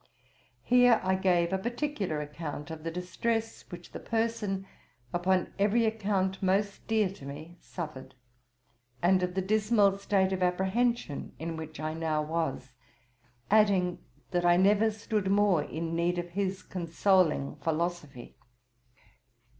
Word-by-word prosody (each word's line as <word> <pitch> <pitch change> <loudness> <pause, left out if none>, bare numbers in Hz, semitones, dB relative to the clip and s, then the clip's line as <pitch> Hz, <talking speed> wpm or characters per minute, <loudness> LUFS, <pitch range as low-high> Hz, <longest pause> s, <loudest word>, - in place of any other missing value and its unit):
[Here 245 -2 +5
I 190 0 +2
gave 180 -2 +2
a 190 - +1
particular 235 - -2
account 150 0 -6
of 160 -1 -7
the 165 - -2
distress 225 +6 -2
which 175 -1 -10
the - - -7
person, 225 -4 -1 0.5
upon 180 +1 +1
every 215 +3 +3
account 200 -3 0
most 195 +1 0
dear 220 -2 +2
to 195 - -13
me, 155 +5 -9
suffered; 150 -7 -7 0.9
and 185 +1 +4
of 180 0 -2
the 190 - 0
dismal 210 0 +3
state 195 -1 +1
of 185 - -2
apprehension 190 - 0
in 165 +1 -4
which 160 -2 -8
I 155 0 -2
now 160 -1 -1
was: 155 -5 -3 0.8
adding 200 -4 +3 0.3
that 175 -1 +1
I 175 0 +5
never 205 +4 +4
stood 215 -2 -2
more 200 -4 +3
in 165 +2 -4
need 175 +1 +1
of 175 0 -4
his 190 0 -2
consoling 175 -3 +1
philosophy. 160 -6 -3
185 Hz, 135 wpm, -29 LUFS, 165-205 Hz, 0.9 s, Here